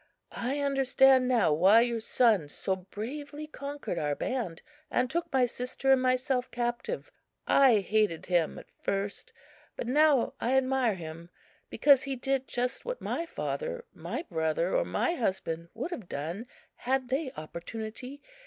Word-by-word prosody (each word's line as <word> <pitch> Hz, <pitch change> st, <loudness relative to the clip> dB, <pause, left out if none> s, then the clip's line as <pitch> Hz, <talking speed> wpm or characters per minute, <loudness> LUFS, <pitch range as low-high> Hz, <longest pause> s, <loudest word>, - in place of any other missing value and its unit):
I 270 Hz, +4 st, -2 dB
understand 270 Hz, -2 st, +4 dB
now 230 Hz, -11 st, +3 dB
why 190 Hz, +9 st, +6 dB
your 235 Hz, -1 st, 0 dB
son 220 Hz, -, +2 dB
so 190 Hz, +5 st, -2 dB
bravely 280 Hz, +11 st, -7 dB
conquered 285 Hz, -, -5 dB
our 145 Hz, -2 st, 0 dB
band, 220 Hz, -, -3 dB, 0.3 s
and 250 Hz, -, +1 dB
took 340 Hz, +1 st, -2 dB
my 260 Hz, -2 st, +4 dB
sister 250 Hz, +2 st, -1 dB
and 265 Hz, -1 st, +5 dB
myself 255 Hz, 0 st, +1 dB
captive. 240 Hz, -, -3 dB, 0.3 s
I 255 Hz, -7 st, +5 dB
hated 210 Hz, -5 st, +1 dB
him 175 Hz, -3 st, +1 dB
at -, -, -12 dB
first, 200 Hz, +1 st, -3 dB, 0.4 s
but -, -, -4 dB
now 290 Hz, 0 st, +3 dB
I 255 Hz, +3 st, +2 dB
admire 260 Hz, -4 st, +2 dB
him, 165 Hz, 0 st, -8 dB, 0.4 s
because 280 Hz, -3 st, +5 dB
he 275 Hz, -1 st, -3 dB
did 270 Hz, +1 st, -1 dB
just 250 Hz, +1 st, -2 dB
what -, -, -4 dB
my 335 Hz, -, -3 dB
father, 485 Hz, +6 st, -4 dB
my -, -, -5 dB
brother 160 Hz, +1 st, 0 dB
or -, -, +2 dB
my 340 Hz, -, 0 dB
husband 185 Hz, -, -2 dB
would 345 Hz, -, -4 dB
have 225 Hz, -, -6 dB
done 170 Hz, -, -4 dB, 0.3 s
had 260 Hz, 0 st, -1 dB
they 265 Hz, +1 st, -1 dB
opportunity. 220 Hz, -, -7 dB
250 Hz, 150 wpm, -29 LUFS, 195-270 Hz, 0.4 s, why